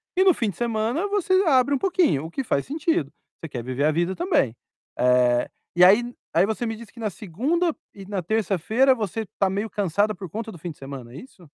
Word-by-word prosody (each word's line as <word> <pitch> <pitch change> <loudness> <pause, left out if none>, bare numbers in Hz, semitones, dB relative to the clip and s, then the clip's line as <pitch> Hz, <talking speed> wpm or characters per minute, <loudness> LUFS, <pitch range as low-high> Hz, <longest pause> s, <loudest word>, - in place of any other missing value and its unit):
e 375 - +4
no 375 - +6
fim 225 -8 -1
de 175 - -8
semana 235 - -1
você 400 -2 0
abre 280 -1 +4
um - - +3
pouquinho, 340 - +1
o 165 - -8
que 270 - -3
faz 140 - 0
sentido. 305 - -1 0.3
Você 165 - -7
quer 120 -4 -5
viver 130 +2 -2
a 155 - +4
vida 175 +4 0
também. 335 - +1 0.4
Eh, 125 -1 +3 0.3
e 175 - +6
aí 240 +6 +5 0.2
aí 175 +4 +4
você 220 +3 -2
me 225 -1 -2
diz 225 -1 -12
que 235 - -16
na 215 -2 -1
segunda 270 - -1 0.2
e 195 -1 -11
na 195 -1 -3
terça-feira 220 +6 +2
você 220 0 -3
tá 195 -1 +3
meio 205 +3 -2
cansada 205 +2 0
por 190 -1 -8
conta 220 +5 -5
do 175 - -11
fim 170 +2 -6
de 150 - -14
semana, 135 -3 -9
é - - -9
isso? 185 -5 -13
210 Hz, 230 wpm, -24 LUFS, 165-250 Hz, 0.4 s, no